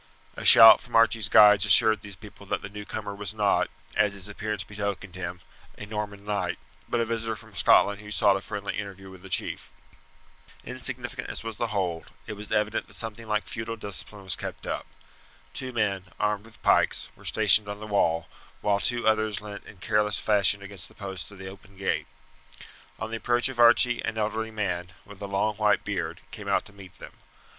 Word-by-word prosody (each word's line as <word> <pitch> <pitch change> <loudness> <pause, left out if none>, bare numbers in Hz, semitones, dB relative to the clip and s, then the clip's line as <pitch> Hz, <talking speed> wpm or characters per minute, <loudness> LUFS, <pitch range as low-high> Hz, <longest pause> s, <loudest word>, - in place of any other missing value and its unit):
A - - -7
shout 115 0 +10
from 120 - -9
Archie's 115 -1 +4
guides 105 -2 +7
assured 105 +1 +6
these 100 -1 -10
people 100 0 -14
that - - -2
the - - -6
newcomer 105 0 -6
was 100 +1 -5
not, 105 -2 +2 0.3
as 105 -1 +2
his 100 0 -4
appearance 105 -1 -4
betokened 100 -2 -5
him, 90 -1 -6 0.4
a 100 - -7
Norman 105 -1 -6
knight, 95 -4 -2 0.3
but 120 - 0
a 115 - +1
visitor 115 -1 -3
from 110 -1 -14
Scotland 100 +3 +4
who 105 - -11
sought 100 -1 +3
a 95 - -3
friendly 100 0 -5
interview 95 -1 -8
with 95 -1 -13
the 95 - -12
chief. - - -1 0.9
Insignificant - - -3
as - - -4
was 115 -2 -6
the 120 - -1
hold, 90 -6 -2 0.2
it - - -6
was 105 0 -8
evident 105 +1 0
that - - -15
something 115 0 -5
like 105 0 0
feudal 115 0 -5
discipline 100 -1 -5
was 95 - +4
kept - - -7
up. - - -4 0.7
Two 130 -1 -5
men, 100 -5 -1
armed 105 0 -1
with 115 0 -17
pikes, - - +2
were - - -18
stationed 105 -1 +4
on 100 0 -6
the 110 - -7
wall, 85 -6 +1 0.3
while 100 -1 +1
two 120 +2 -1
others 110 -1 +1
leant 105 -1 -9
in 100 - -13
careless 105 +1 +1
fashion 100 -1 +2
against 100 -4 -6
the - - -19
posts 95 -4 -6
of 100 - -14
the 95 - -9
open 95 0 -13
gate. 95 - -2 0.9
On 110 - -6
the 115 - -2
approach 120 +2 +1
of 130 -2 -8
Archie 120 +1 +5
an 110 - -3
elderly 110 +1 -2
man, 90 -5 -3
with 100 -1 -14
a 100 - -4
long 100 +2 -1
white 105 -1 +2
beard, 90 -5 -4
came 105 -2 -9
out 100 - +1
to 105 - -12
meet 95 -2 -14
them. - - -12
105 Hz, 200 wpm, -26 LUFS, 100-110 Hz, 0.9 s, shout